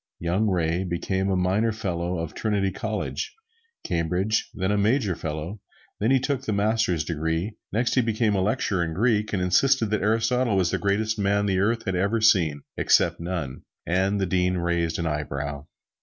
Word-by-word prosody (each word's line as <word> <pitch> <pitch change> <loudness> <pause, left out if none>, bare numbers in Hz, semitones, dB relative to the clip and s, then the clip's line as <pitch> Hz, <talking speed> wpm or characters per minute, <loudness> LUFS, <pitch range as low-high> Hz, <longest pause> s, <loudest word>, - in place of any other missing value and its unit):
Young 90 +6 0
Ray 85 -2 0
became 95 +2 -1
a 95 - +1
Minor 95 +5 +1
Fellow 90 -5 -3
of 80 -1 -4
Trinity 100 -3 0
College, 110 - -4 0.5
Cambridge; 90 +6 0
then 95 +1 -1
a - - +2
Major 105 -2 +2
Fellow; 80 +7 -5 0.4
then 110 - +1
he 135 0 +4
took 135 0 -1
the 110 -5 -2
Master's 100 -5 +1
degree; 80 +6 -2 0.2
next 115 +3 +1
he 130 - +4
became 115 -1 +1
lecturer 95 -1 0
on 80 -1 -4
Greek; 105 -1 +1
and 95 -3 0
insisted 110 +5 +3
that 105 - +1
Aristotle 115 +1 +2
was 90 -3 +2
the - - 0
greatest 110 +2 0
man 100 0 +2
the 95 -2 +1
world 115 +4 +1
had 95 - -1
ever 100 +5 +1
seen, 85 -10 +3
except - - +3
none, 85 -6 -4 0.2
and 95 +3 +1
the 95 - +1
Dean 90 0 +1
raised 85 -2 0
an 85 - -2
eyebrow. 75 -2 -3
95 Hz, 175 wpm, -25 LUFS, 85-110 Hz, 0.5 s, he